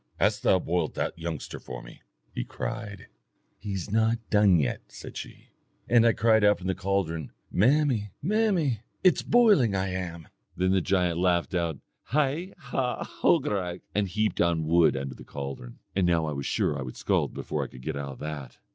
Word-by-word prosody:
'Hast - - +2
thou 95 - +4
boiled 85 -2 -1
that - - -2
youngster 80 -2 -5
for - - -8
me?' - - -13 0.3
he - - -2
cried. 110 - -6 0.5
'He's 100 -2 -4
not 115 +1 +3
done 105 -4 +5
yet,' 70 -6 0
said - - -10
she, - - -9 0.4
and 115 -1 +5
I 115 - +5
cried 110 -1 +3
out 105 0 +5
from 90 - -10
the 95 - +1
caldron, 95 -5 -2 0.2
'Mammy, 125 -1 +3
mammy, 185 - +1 0.2
it's 185 -4 +5
boiling 205 - +4
I 95 0 0
am.' 85 -3 -5 0.3
Then 95 +1 +2
the 95 -1 +3
giant 90 -2 +1
laughed 90 -1 +1
out 85 -4 0 0.3
HAI, 150 +6 0
HAW, 130 -5 -2
HOGARAICH, 100 - 0
and 105 -1 +1
heaped 105 +4 0
on 85 -2 +2
wood 85 -2 +4
under 65 0 -4
the - - -12
caldron. 70 -3 -7 0.2
"And 95 -2 +2
now 85 -2 +2
I 75 - -2
was 70 -1 -4
sure 75 - +1
I 70 - -4
would 65 -1 -7
scald - - 0
before - - -2
I - - -5
could 65 - -13
get 80 +1 -3
out 70 -1 -4
of 65 - -14
that. 75 -3 -6
95 Hz, 185 wpm, -27 LUFS, 80-115 Hz, 0.5 s, done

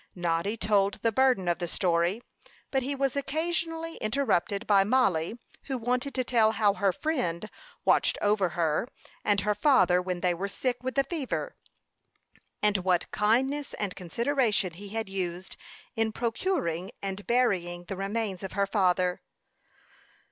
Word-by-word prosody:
Noddy 175 +4 -1
told 200 -1 +2
the 230 - +3
burden 250 -6 +3
of 175 0 +1
the 175 - -2
story; 175 +5 0 0.5
but 265 - +1
he 275 +3 -2
was 275 -1 0
occasionally 325 +3 -2
interrupted 215 -5 0
by 200 -2 +5
Mollie, 205 -5 +1 0.3
who 265 -2 -2
wanted 250 +3 -1
to 255 - +1
tell 225 -3 +3
how 210 -3 +3
her 200 -1 +2
friend 215 - -2 0.4
watched - - +3
over 205 -3 +2
her 165 +5 +1 0.4
and 205 -1 +2
her 210 0 +1
father 200 - +4
when 180 -1 -3
they 180 -1 +2
were 185 +4 -3
sick 245 +4 -2
with 260 0 -4
the 275 - +4
fever, 315 - -3 1.1
and 210 -1 +3
what 180 -2 0
kindness 265 +7 +1
and 200 -3 -3
consideration 215 - 0
he 200 +4 -10
had 225 +1 -3
used 185 -1 -4 0.4
in 225 0 +1
procuring 220 - -1
and 195 +1 -4
burying 180 -8 +1
the 195 +2 -6
remains 200 0 -2
of 195 - -6
her 200 0 +2
father. 185 -3 +1
205 Hz, 150 wpm, -28 LUFS, 185-255 Hz, 1.1 s, by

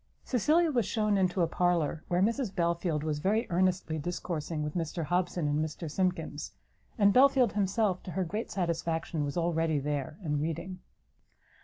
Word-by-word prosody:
Cecilia 310 - +2
was 240 -7 +1
shewn 215 -2 +1
into 185 -2 +2
a - - +2
parlour, 170 -3 0
where 180 +1 +2
Mrs 225 -1 0
Belfield 170 -3 0
was 155 -2 -1
very 215 +8 +1
earnestly 180 -3 +1
discoursing 165 -1 -3
with 150 0 -3
Mr 165 0 -2
Hobson 175 -1 0
and 145 +1 +1
Mr 155 0 -5
Simkins; 185 +2 -2 0.4
and 200 -2 +5
Belfield 260 -3 +5
himself, 200 -1 +1
to 180 - -8
her 190 - 0
great 210 +7 -4
satisfaction, 165 -3 -1
was 145 +3 -3
already 165 -2 +1
there, 145 +1 -3
and 150 -3 -1
reading. 175 +4 -4
175 Hz, 160 wpm, -30 LUFS, 160-195 Hz, 0.4 s, and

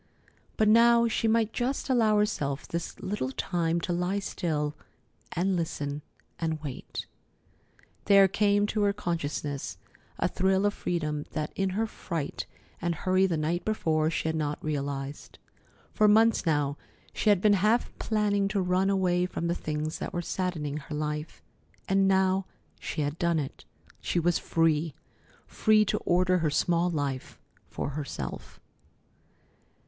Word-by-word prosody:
But 215 - +3
now 235 +2 +6
she 225 0 0
might 225 0 +2
just 255 +3 -1
allow 225 -5 +3
herself 150 -10 -1
this 170 0 -4
little 190 -10 -2
time 170 +3 0
to 175 - -1
lie 180 +3 0
still 155 -6 -2 0.6
and 185 +3 +1
listen 150 -4 -3 0.4
and 160 -2 -1
wait. 135 -4 -6 1.0
There 200 -1 +7
came 205 +1 +2
to 210 0 -1
her 200 -1 +3
consciousness 150 -7 -3 0.4
a - - +1
thrill 190 +1 +1
of 205 - +2
freedom 155 -6 -2
that 155 -1 -3
in 195 0 0
her 225 - +2
fright 165 -8 -4 0.3
and 170 0 0
hurry 185 +3 +2
the 170 -3 -1
night 165 +3 -1
before 160 -7 +1
she 160 - -2
had 160 - 0
not 150 -1 -1
realized. 140 -1 -4 0.6
For 215 - +4
months 220 -2 +4
now 145 -2 +1 0.4
she 215 - +1
had 205 -3 +5
been 210 +2 +4
half 210 +5 +2
planning 205 -2 +1
to 200 0 -1
run 185 +1 +2
away 180 -2 +2
from 170 - -4
the 170 - +1
things 155 -1 -3
that - - -5
were 175 - -2
saddening 160 -6 -2
her 150 0 -6
life, 150 +1 -4 0.4
and 195 0 +3
now 190 0 +2 0.3
she 155 - -3
had 145 +2 -2
done 170 -1 +2
it. 140 -3 -5 0.3
She 175 - 0
was 175 +1 +2
free! 160 -2 +1 0.5
Free 215 -1 +3
to - - 0
order 180 +1 +2
her 160 -2 +1
small 170 +3 +2
life 140 -5 -3 0.3
for - - -3
herself. 145 0 -6
175 Hz, 150 wpm, -28 LUFS, 155-200 Hz, 1.0 s, There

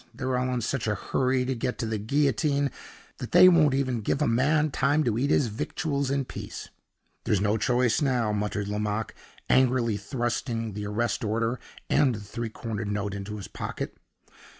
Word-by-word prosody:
They're 130 0 -1
all 125 0 0
in 125 -1 -1
such 115 +1 -2
a 105 - +1
hurry 130 +4 0
to 130 - 0
get 125 0 -3
to 120 - -2
the 110 -1 -2
guillotine 140 +4 +1 0.5
that 125 - -7
they 180 +1 +9
won't 155 -6 +5
even 130 -4 0
give 135 - 0
a 150 - +2
man 150 +6 +2
time 145 +4 +2
to 120 -6 0
eat 140 +3 +1
his 145 - +3
victuals 140 +5 -2
in 140 -1 0
peace!" - - -8 0.6
"There's 105 -4 +2
no 105 +2 +2
choice 120 +2 +2
now," 125 -6 +1
muttered 105 -1 -2
Lomaque, 105 +1 -2 0.3
angrily 125 -4 +3
thrusting 115 0 -2
the 105 +1 -4
arrest 115 +3 -1
order 115 +3 0 0.3
and 130 -5 +3
the - - -6
three 110 +3 -5
cornered 110 -1 -5
note 100 -1 -2
into 100 +1 -5
his 100 - -7
pocket. - - -5
120 Hz, 180 wpm, -27 LUFS, 105-135 Hz, 0.6 s, they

